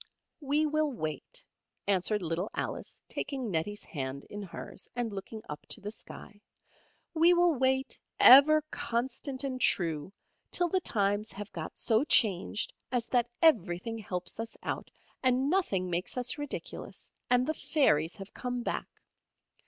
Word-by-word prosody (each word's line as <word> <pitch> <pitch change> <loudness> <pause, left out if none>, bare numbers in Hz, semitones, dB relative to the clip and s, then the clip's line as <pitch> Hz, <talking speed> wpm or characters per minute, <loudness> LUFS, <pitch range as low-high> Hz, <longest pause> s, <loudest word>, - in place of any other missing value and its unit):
"We 295 +1 +1
will 305 0 +1
wait," 235 - -3 0.4
answered 200 +1 +2
little 170 +4 -2
Alice, - - -5
taking 260 -6 -3
Nettie's 195 +5 -2
hand 135 -2 -5
in 205 - -5
hers, 190 -4 -8
and 240 -3 -2
looking 205 +3 -7
up 150 - -7
to - - -1
the 205 0 -6
sky, 210 -1 -10 0.7
"we 340 +2 +5
will 350 -1 +4
wait 265 0 +1 0.2
ever 300 +4 +9
constant 260 +3 -2
and 260 -2 -3
true 165 -5 +1 0.4
till 350 -1 0
the 375 +2 +1
times 205 - 0
have 205 +1 -7
got 160 -2 -6
so 225 +2 +2
changed 210 - +3 0.2
as 245 -2 0
that 240 -1 +2
everything 225 - +3
helps 180 -1 -4
us 225 0 -5
out, - - -3 0.3
and 260 +2 +3
nothing 200 - +1
makes 180 +6 -2
us 250 +4 0
ridiculous, 290 -1 -7 0.2
and 250 0 +4
the 315 - 0
fairies 170 - +2
have 195 0 -10
come 245 -1 -3
back. - - -3
230 Hz, 145 wpm, -30 LUFS, 195-275 Hz, 0.7 s, ever